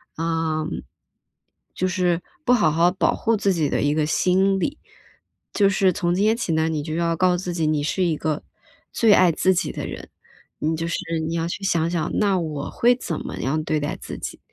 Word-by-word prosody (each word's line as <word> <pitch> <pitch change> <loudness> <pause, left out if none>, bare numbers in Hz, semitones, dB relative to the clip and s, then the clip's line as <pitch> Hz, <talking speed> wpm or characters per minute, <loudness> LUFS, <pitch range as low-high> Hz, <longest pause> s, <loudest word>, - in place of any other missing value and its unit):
啊， 160 -1 -1 1.1
就 185 - 0
是 180 -2 0 0.2
不 250 - +3
好 205 -11 +3
好 165 +3 +4
保 185 - +1
护 230 -2 +1
自 200 -1 +1
己 155 -5 0
的 - - 0
一 145 +1 +2
个 155 -1 0
心 190 +4 +2
理。 285 - -2 0.7
就 200 -2 +3
是 190 -1 +3
从 175 -1 -1
今 195 +3 +1
天 220 +2 +3
起 180 -9 -1
呢， 160 0 +1
你 155 -2 -2
就 155 0 -5
要 170 0 0
告 180 +1 +3
诉 180 - -4
自 175 - -2
己， 165 - 0
你 155 -1 +1
是 185 +5 0
一 170 -3 +1
个 155 0 -2 0.5
最 225 -3 +5
爱 185 -3 +5
自 185 - +2
己 180 - 0
的 - - -5
人， - - -8 0.5
你 160 +1 0
就 165 +1 -3
是， 170 - -1 0.3
你 165 - -3
要 165 0 -1
去 185 +3 -5
想 170 -4 +1
想， 170 -2 -2
那 200 -3 +2
我 150 -4 -4
会 245 +1 +3
怎 170 -10 -4
么 - - -6
样 155 +4 -1
对 155 0 0
待 145 - -3
自 - - -7
己。 - - -6
170 Hz, 235 characters per minute, -23 LUFS, 160-190 Hz, 1.1 s, 最